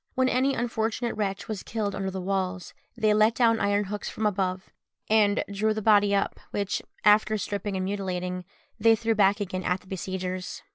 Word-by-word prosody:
When 260 -1 +3
any 265 +2 +2
unfortunate 230 0 -1
wretch 195 -2 -3
was 215 -3 -4
killed 210 -3 -3
under 195 0 -2
the 190 0 -5
walls, 185 -1 -2 0.2
they 215 -2 +3
let 215 +2 +4
down 230 -2 +3
iron 205 0 +2
hooks 205 +1 -5
from 220 - -3
above, 190 -2 -1 0.4
and 210 -2 +4
drew 215 +2 +1
the 215 - -2
body 205 -1 +5
up, 200 - -1
which, 200 -1 -2 0.2
after 215 +1 +5
stripping 205 -1 -3
and 185 0 -1
mutilating, 180 -2 -3 0.4
they 225 +1 +6
threw 225 +1 0
back 200 -1 +3
again 185 -2 -3
at 180 +1 0
the - - -21
besiegers. 185 -1 -4
205 Hz, 185 wpm, -27 LUFS, 190-220 Hz, 0.4 s, they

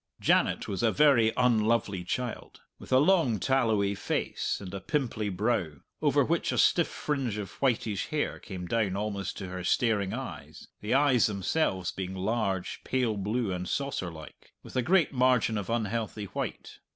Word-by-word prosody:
Janet - - +2
was 95 - -3
a 115 -2 +3
very 135 -7 +5
unlovely 110 -5 +2
child, 125 +6 -4 0.2
with - - -12
a 130 - +6
long, 145 - +3
tallowy 110 -5 +2
face 100 - -2
and 95 -2 -8
a 100 - -5
pimply 120 -8 -1
brow, 100 -4 0 0.3
over - - +3
which - - 0
a - - -2
stiff - - +4
fringe 135 -8 -2
of 105 -2 -5
whitish 115 -6 0
hair 150 -1 -2
came 95 -3 -7
down 100 0 0
almost 100 -1 -3
to 95 -2 -6
her 90 0 -5
staring 105 -1 +1
eyes, - - -7
the 105 +4 0
eyes 135 -4 +4
themselves 100 - -1
being 95 0 -5
large, 95 -1 -2
pale 125 -4 0
blue, 105 +2 -1
and 90 0 -4
saucer 140 -10 -2
like, 80 -3 -13
with - - -12
a 130 - +3
great 170 +3 +3
margin 125 -3 +3
of 100 -3 -3
unhealthy 110 -2 -2
white. - - -6
110 Hz, 165 wpm, -29 LUFS, 95-125 Hz, 0.3 s, a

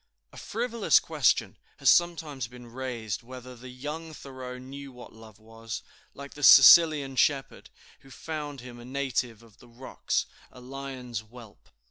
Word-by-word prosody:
A - - -13
frivolous 235 -1 +1
question - - 0 0.2
has - - -4
sometimes 160 -7 0
been 125 +1 -13
raised 115 -4 -5
whether 125 +1 -11
the 125 +2 -12
young 150 +5 -7
Thoreau 130 -3 -9
knew 135 +2 -10
what 125 -1 -13
love 110 -2 -15
was, 115 +1 -9 0.3
like 140 0 -10
the 145 - -11
Sicilian 150 -2 +7
shepherd, 135 +1 0 0.3
who 135 - -19
found 145 -1 -7
him 120 -1 -11
a - - -11
native 125 -4 -3
of 115 -1 -21
the 120 - -17
rocks, 125 +3 -3 0.3
a - - -14
lion's 130 -2 -7
whelp. 110 -1 -15
130 Hz, 150 wpm, -27 LUFS, 120-140 Hz, 0.3 s, Sicilian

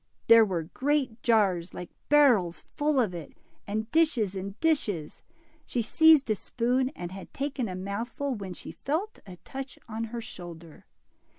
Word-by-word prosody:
There 230 -1 +8
were 180 -6 -1
great 260 - -1
jars, 195 -7 +2
like 180 - -7 0.2
barrels, 245 -13 +4
full 295 -1 +2
of 215 -7 +1
it, 170 -3 -8 0.3
and 220 +2 -3
dishes 290 - +2
and 195 +1 -6
dishes. 210 - 0 0.5
She 240 - -1
seized 320 +3 +5
a - - +3
spoon 250 +5 0
and 175 0 -6
had 190 0 -9
taken 275 -5 -2
a 185 - -4
mouthful, 225 +9 -3
when 195 -5 -6
she - - -9
felt 340 +10 -3
a 185 - -9
touch 270 0 -7
on 225 0 -3
her 235 +1 -5
shoulder. 170 -7 -10
225 Hz, 160 wpm, -28 LUFS, 185-270 Hz, 0.5 s, There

